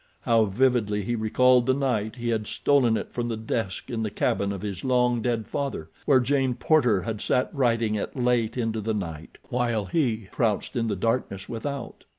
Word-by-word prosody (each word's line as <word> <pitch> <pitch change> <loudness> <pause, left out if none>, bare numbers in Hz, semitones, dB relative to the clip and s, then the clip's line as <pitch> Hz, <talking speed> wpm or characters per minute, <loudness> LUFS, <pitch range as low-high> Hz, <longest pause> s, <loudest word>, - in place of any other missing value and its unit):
How 115 -2 +3
vividly 105 -1 +1
he 120 - -2
recalled 125 +3 +3
the 130 - +3
night 120 -6 -1
he 120 -1 -3
had 110 -2 -1
stolen 125 -6 +2
it - - -6
from 120 -1 -2
the 115 -2 -2
desk 110 +1 -3
in 115 -2 -2
the 110 - -1
cabin 100 0 0
of 100 0 -6
his 100 -4 -4
long 125 -2 +2
dead 115 -2 -1
father, 135 - -4
where 135 -3 +5
Jane 130 0 +1
Porter 120 - +3
had 110 0 -4
sat 125 +3 0
writing 115 -5 +1
it 105 - -3
late 120 -2 +1
into 115 -2 -1
the 110 +1 -1
night, 85 -5 -6
while 120 -4 0
he 115 - 0
crouched 110 +2 -1
in 115 -2 0
the 105 - -1
darkness 100 -2 -1
without. 130 +2 -5
115 Hz, 190 wpm, -26 LUFS, 105-125 Hz, -, where